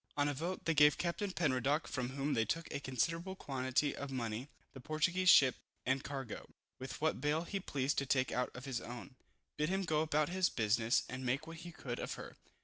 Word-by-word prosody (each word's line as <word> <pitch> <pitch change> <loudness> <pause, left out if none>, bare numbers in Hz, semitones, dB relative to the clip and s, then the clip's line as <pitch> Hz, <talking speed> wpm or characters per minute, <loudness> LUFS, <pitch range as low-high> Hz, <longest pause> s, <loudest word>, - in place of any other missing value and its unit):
On 145 0 +3
a 145 - 0
vote, 170 +7 -4
they 165 - +3
gave 150 0 +6
Captain 180 +4 -1
Penruddock 145 -3 +1
(from 130 -1 -3
whom 140 +2 0
they 115 - +3
took 165 +8 -1
a - - -1
considerable 165 +8 -1
quantity 135 -2 0
of 140 - -5
money) 120 0 -3 0.2
the 135 - -9
Portuguese 170 +7 +2
ship 130 -7 +7 0.3
and 130 +1 +1
cargo, 135 -4 -5 0.3
with 130 0 -6
what 155 -4 +1
bale 150 +3 +1
he 195 +3 -3
pleased 140 -6 0
to 140 - -3
take 130 -1 +2
out 125 - 0
of 125 +1 -7
his 130 -4 -2
own, 120 +3 -8 0.4
bid 150 +1 +1
him 195 +1 +1
go 155 -3 +2
about 155 -1 +1
his 185 0 +2
business, 110 +1 +2
and 125 +1 -5
make 130 +5 0
what 165 0 -8
he 175 +1 -8
could 125 -6 -5
of - - -3
her. - - -9
140 Hz, 215 wpm, -35 LUFS, 130-160 Hz, 0.4 s, ship